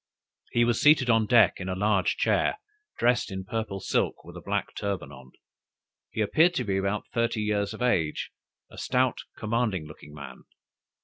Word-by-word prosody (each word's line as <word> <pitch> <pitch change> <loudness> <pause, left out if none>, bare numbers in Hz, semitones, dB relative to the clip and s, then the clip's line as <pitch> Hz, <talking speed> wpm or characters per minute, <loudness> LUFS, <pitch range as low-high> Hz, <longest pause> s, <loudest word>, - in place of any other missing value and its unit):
He 120 0 +3
was 120 -1 +1
seated 145 -5 +5
on 115 -1 +3
deck, 120 -1 +5
in 95 0 -5
a 95 - -2
large 100 -1 +1
chair, - - +1 0.4
dressed 120 0 +2
in 95 0 -4
purple 110 -3 -3
silk, - - -1
with - - -11
a - - -8
black - - -2
turban 100 -2 -3
on. 65 -1 -13 0.8
He 110 - -3
appeared 160 - +3
to 130 - 0
be 100 -4 -1
about 100 +2 -1
thirty 115 -1 0
years 105 -1 0
of - - -5
age, 85 -11 0 0.4
a - - -10
stout 125 -1 +1 0.2
commanding 110 -6 -1
looking 75 -1 -13
man. 70 -4 -10
105 Hz, 175 wpm, -27 LUFS, 95-120 Hz, 0.8 s, seated